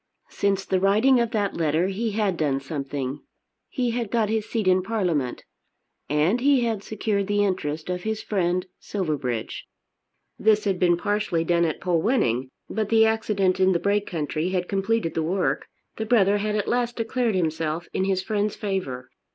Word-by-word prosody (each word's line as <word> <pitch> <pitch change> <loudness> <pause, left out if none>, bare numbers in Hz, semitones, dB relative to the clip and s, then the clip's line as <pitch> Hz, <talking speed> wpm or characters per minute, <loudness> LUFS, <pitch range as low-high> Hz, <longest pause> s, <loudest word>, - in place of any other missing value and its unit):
Since 195 -1 0
the 190 - +1
writing 215 +7 +4
of 235 -1 +1
that 205 -3 -1
letter 160 +1 +1
he 215 +3 -2
had 205 -3 +1
done 145 -4 0
something. 140 -1 -4 0.5
He 250 -4 -1
had 235 -2 -2
got 225 -2 +1
his 220 -1 -1
seat 220 -5 -1
in 185 0 +4
Parliament. 180 - -1 0.7
And 155 - +2
he 275 -1 +4
had 225 -4 -1
secured 205 -2 -1
the 205 0 +2
interest 155 -5 -2
of 180 0 -2
his 220 +2 -2
friend 180 -3 0
Silverbridge. 145 - -3 0.7
This 215 0 +3
had 195 -3 0
been 175 -2 +4
partially 205 -3 0
done 170 0 +2
at 160 - -2
Polwenning; 165 - +1 0.2
but 215 -2 -2
the 225 -1 +5
accident 205 -4 +1
in 190 0 +4
the 170 - +1
Brake 200 +2 +1
country 160 0 -2
had 180 -1 -1
completed 200 -2 0
the 165 - 0
work. 180 +4 0 0.3
The 220 - -3
brother 205 -3 +4
had 210 +1 -1
at 210 - -1
last 240 0 0
declared 230 -1 0
himself 160 -1 -1
in 190 - 0
his 190 -1 0
friend's 210 0 -1
favour. 180 - -3
195 Hz, 175 wpm, -24 LUFS, 165-215 Hz, 0.7 s, the